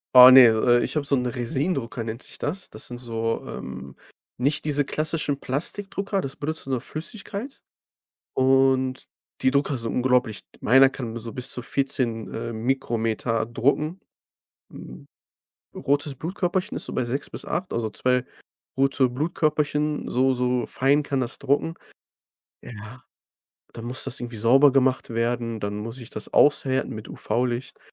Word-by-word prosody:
Oh 125 0 +12
ne, 130 -1 +10
äh, 120 +2 +3
ich - - -3
habe 145 - -1
so 140 - +2
'n 125 - 0
Resin-Drucker 125 0 -2
nennt 115 +2 -5
sich - - -8
das. 180 +6 -4
Das 110 - -8
sind 120 - -7
so, 115 -2 -2
ähm - - -8 0.4
nicht 140 +5 0
diese 145 -1 +1
klassischen 150 -1 -1
Plastikdrucker, 195 - -3
das 135 -7 -4
benutzt 155 +1 -4
nur 130 -3 -1
Flüssigkeit 205 - -6 0.7
und 130 0 +2 0.4
die 130 - +4
Drucker 140 0 +1
sind 115 -1 -4
unglaublich. 125 -4 +1 0.2
Meiner 135 +3 +6
kann 120 -4 -6
so 115 0 -7
bis 125 +1 -3
zu 125 - -2
14, 120 -4 -2
äh, 115 +1 -4
Mikrometer 115 -1 -1
drucken 150 +9 0 0.7
Hm, 65 - -11 0.7
rotes 145 +1 0
Blutkörperchen 180 +4 -2
ist - - -4
so - - -6
bei - - 0
6 130 +4 -3
bis - - -7
8, 185 - -3
also 115 -2 -1
zwei 125 +3 +1 0.5
rote 135 -1 +3
Blutkörperchen 150 +1 0
so 130 +1 +2
so 125 -1 0
fein 140 +3 +2
kann 140 -2 -1
das 125 -1 -3
drucken. 145 +4 +1 0.9
Ja. 115 +3 -10 0.7
Dann 115 +1 -8
muss 130 +4 -2
das 125 - -5
irgendwie 120 -1 -6
sauber 135 +6 +6
gemacht 130 -1 +2
werden, 115 0 -1
dann 100 0 -3
muss 115 +4 -6
ich 120 - -10
das 110 - -7
aushärten 135 -2 +3
mit 110 0 -8
UV-Licht. 125 +1 -2
130 Hz, 155 wpm, -24 LUFS, 120-145 Hz, 0.9 s, Oh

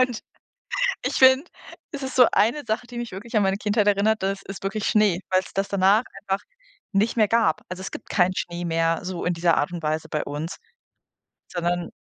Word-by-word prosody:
Und 250 -3 +1 0.8
ich - - -1
finde, 260 +4 +6 0.5
es 285 -2 -6
ist 265 - -5
so 250 -2 +7
eine 235 +8 +2
Sache, 220 +3 -1
die 240 0 -9
mich 240 - -5
wirklich 220 +5 -8
an 210 - +4
meine 195 +1 +1
Kindheit 210 0 +1
erinnert 205 +1 +2
das 195 0 -1
ist 195 0 -7
wirklich 205 +2 -2
Schnee, 210 -5 +3
weil's 185 0 +1
das 195 0 0
danach 200 +4 +4 0.2
einfach 195 -1 -2 0.5
nicht 215 +4 +1
mehr 215 -2 +4
gab. 225 -9 +2
Also, 185 +1 -6
es 195 - -5
gibt - - -9
keinen 185 -1 +2
Schnee 175 0 -4
mehr 165 0 +1
so 180 -1 -4
in 175 - +1
dieser 170 -1 +2
Art 145 - 0
und 170 -2 -5
Weise 155 +1 -1
bei 150 - -1
uns, 155 +6 -5 1.0
sondern 175 0 -1
195 Hz, 205 wpm, -24 LUFS, 175-220 Hz, 1.0 s, so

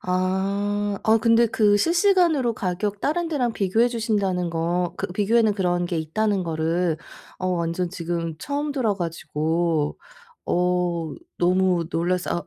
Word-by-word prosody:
아. 195 +2 -1
아 220 +1 +5
근데 230 +1 +4
그 210 -2 +3
실시간으로 335 - +3
가격 200 +2 -2
다른 335 +3 0
데랑 250 -7 0
비교해 220 +5 +2
주신다는 205 -7 -1
거 170 +2 -1
그 - - -2
비교에는 215 +2 +2
그런 175 -2 0
게 175 - -2
있다는 195 +5 0
거를 165 +1 0 0.4
어 185 - -3
완전 170 0 -1
지금 170 -3 -3
처음 290 - -3
들어 240 -7 0
가지고 165 -2 -1 0.5
어 180 -2 0 0.2
너무 180 -1 +2
놀라서 175 +1 -1
185 Hz, 265 characters per minute, -23 LUFS, 170-220 Hz, 0.5 s, 아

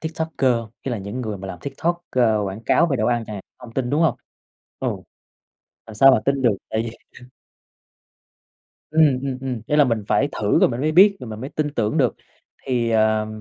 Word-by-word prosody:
TikToker 160 -4 -1
hông? 115 -2 -4
Ý 135 - -3
là 115 - -2
những 100 +6 -5
người 110 -4 -4
mà 95 - -7
làm 90 - -7
TikTok, 170 - -3
ơ, 115 -4 +2
quảng 95 +2 -5
cáo 170 - +4
về 140 -5 0
đồ 110 - 0
ăn 120 -1 0
chẳng 105 - -6
hạn, 95 - -8 0.2
hông 120 -3 -12
tin, 125 -2 -1
đúng 150 +3 +2
hông? 165 - +2 0.6
Ừ. - - 0 1.0
Làm 110 - -10
sao 135 +6 +7
mà 125 - +3
tin 140 -1 0
được, 120 - +5 0.2
tại 110 0 0
vì 115 - -5 2.0
Ừm, 150 -5 +4
ừm, 135 -2 -3
ừm, 130 -3 -4
ý 150 - +1
là 150 - +6
mình 115 -5 -1
phải 140 - +2
thử 105 -1 +1
rồi - - +5
mình 120 +1 -4
mới 155 +2 0
biết 195 +4 +6
rồi 125 - -7
mình 110 0 -7
mới 135 +3 -6
tin 150 -1 -2
tưởng 110 -4 0
được. - - +2 0.5
Thì, 120 -3 0
ờ, 110 -1 +2
125 Hz, 220 wpm, -22 LUFS, 110-145 Hz, 2.0 s, sao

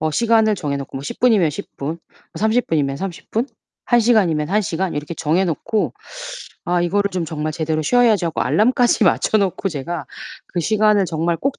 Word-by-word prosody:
어 155 - 0
시간을 220 +2 +3
정해 145 -4 -2
놓고 135 -1 -7
뭐 - - -8
10 145 - -7
분이면 215 -10 +4
10 - - -9
분, 155 +5 -4 0.4
30 220 +3 +1
분이면 140 -4 0
30 185 +1 -6
분, 230 +4 0 0.4
1 240 - +3
시간이면 185 -10 +2
1 210 +2 +2
시간 180 0 -2
이렇게 150 +3 -4
정해 165 +5 +1
놓고 205 +6 -1 0.7
'아 175 -1 +1
이거를 200 +3 +1
좀 180 -3 -2
정말 155 0 -3
제대로 155 0 -1
쉬어야지.' 225 +1 +3
하고 165 - -3
알람까지 240 0 +3
맞춰 190 - +2
놓고 195 0 0
제가 155 -1 -5 0.4
그 175 - -2
시간을 210 +2 +3
정말 165 +1 -1
꼭 275 +9 -2
180 Hz, 325 characters per minute, -20 LUFS, 155-215 Hz, 0.7 s, 분이면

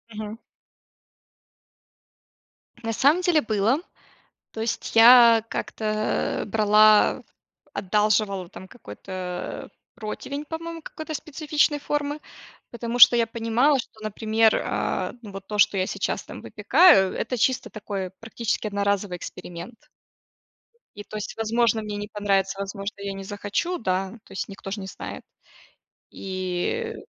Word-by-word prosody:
Мгм. 215 +1 -6 2.4
На 225 0 -2
самом 285 +10 +3
деле, 350 -4 +3
было, 220 +4 +1 0.7
то 220 - -6
есть, 225 0 -3
я 230 -1 +8
как-то, 225 - -5 0.6
э, - - -4
брала, 215 0 +4 0.5
одалживала, 205 -1 +1
там, 190 - -11
какой-то 185 -4 -7 0.3
противень, 250 +6 -6
по-моему, 330 +1 -6
какой-то 315 0 -7
специфичной 300 0 0
формы, 290 +1 -2 0.5
потому 235 0 -4
что 240 - +10
я 230 -1 +2
понимала, 230 +5 +2
что, 225 - -8
например, 220 +1 +2
а, - - -2
ну, 210 -4 -10
вот 195 0 -9
то, 210 - -4
что 200 -1 +4
я 185 0 0
сейчас, - - -2
там, - - -10
выпекаю, 195 - +5
это 250 +2 -3
чисто 255 +2 +1
такой, 200 -3 -5
практически 225 -1 -3
одноразовый 200 -2 -1
эксперимент. 175 +5 -9 1.1
И, 205 - -8
то 215 - -8
есть, 210 - -6
возможно, 225 0 +1
мне 210 -1 -5
не 205 0 -5
понравится, 195 -2 0
возможно, 200 +1 -5
я 200 0 -4
не 195 0 -7
захочу, 205 - -3
да, 190 -2 -1
то - - -19
есть, - - -4
никто 195 -1 -9
ж 205 - -3
не 190 -2 -6
знает. - - -8 0.9
И 190 - -3
215 Hz, 130 wpm, -24 LUFS, 195-240 Hz, 2.4 s, что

